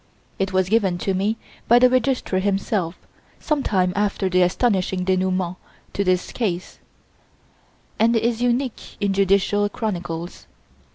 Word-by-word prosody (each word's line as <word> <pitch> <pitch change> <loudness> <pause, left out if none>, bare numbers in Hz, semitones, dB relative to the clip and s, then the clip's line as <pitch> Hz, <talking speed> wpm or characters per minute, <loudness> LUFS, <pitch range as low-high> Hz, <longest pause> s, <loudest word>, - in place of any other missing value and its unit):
It 195 0 0
was 185 -1 +1
given 195 -4 +2
to 195 +2 -1
me 200 +4 0 0.3
by 240 - +6
the 250 +1 +7
Registrar 250 -6 +1
himself, 195 -3 -1 0.4
some 305 -2 0
time 185 -6 +1
after 200 -2 0
the 185 0 +3
astonishing 185 -1 +1
denouement 185 -1 0 0.4
to 200 - 0
this 185 -1 0
case, 185 -7 -3 1.2
and 230 +2 +4
is 230 +1 0
unique 245 0 -1
in 200 -2 0
judicial 200 +1 +2
chronicles. 175 -5 -5
195 Hz, 130 wpm, -22 LUFS, 185-225 Hz, 1.2 s, the